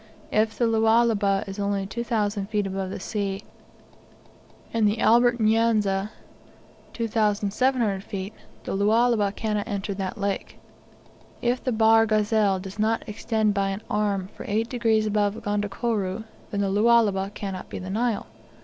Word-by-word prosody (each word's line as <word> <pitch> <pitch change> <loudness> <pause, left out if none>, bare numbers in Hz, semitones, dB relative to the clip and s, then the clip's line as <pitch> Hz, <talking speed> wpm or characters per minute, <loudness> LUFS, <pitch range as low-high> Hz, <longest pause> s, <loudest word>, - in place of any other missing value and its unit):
If 220 +1 +1
the 240 - +2
Lualaba 220 -3 +3
is 195 +1 -7
only 200 -1 -1
2,000 210 -2 -2
feet 210 -2 0
above 190 -1 -3
the - - -5
sea, 195 -1 -3 1.3
and 225 -2 +3
the 210 +2 0
Albert 240 +1 +4
N'Yanza 215 -3 +2 0.8
2,700 215 0 0
feet, 195 +1 -6 0.3
the - - -3
Lualaba 215 +1 +3
cannot 210 0 -2
enter 200 0 -3
that 190 -1 -4
lake. 200 -1 -3 0.8
If 245 +1 0
the 255 - 0
Bahr 225 0 +5
Ghazal 215 -2 +2
does 190 +2 -9
not 220 +1 +1
extend 215 0 0
by 195 -1 0
an 195 +3 -4
arm 200 -3 0
for - - -9
eight 220 +3 0
degrees 225 -3 +1
above 210 -1 +1
Gondokoro, 205 0 -1 0.3
then 200 - -2
the 195 -1 0
Lualaba 205 -2 +3
cannot 195 -2 -5
be - - -6
the 185 0 -6
Nile. 225 +1 0
210 Hz, 140 wpm, -25 LUFS, 200-225 Hz, 1.3 s, Bahr